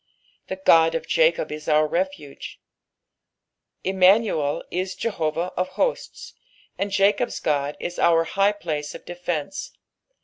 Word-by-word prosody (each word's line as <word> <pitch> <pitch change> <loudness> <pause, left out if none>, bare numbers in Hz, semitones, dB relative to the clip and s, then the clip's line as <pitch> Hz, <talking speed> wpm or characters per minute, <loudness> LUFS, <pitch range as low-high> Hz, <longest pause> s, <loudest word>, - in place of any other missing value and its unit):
" - - -38
T/ie 190 - -3
God 165 0 +6
of 245 - -2
Jacob - - +2
u 150 - -4
vur 155 0 +2
refuge,''' 170 -3 -4 1.3
Immanuel 190 -5 +3
is 185 +1 -2
Jehovah 170 -5 -2
of 185 0 -1
Ho^ts, 485 - -2 0.4
and 200 - -2
Jacob'? 200 +4 +2 0.2
Ood 145 -1 0
is 175 - -5
our 165 -1 +4
high 195 +5 +2
place 155 -7 -4
of - - -11
defence. 175 - -4
175 Hz, 130 wpm, -23 LUFS, 155-195 Hz, 1.3 s, God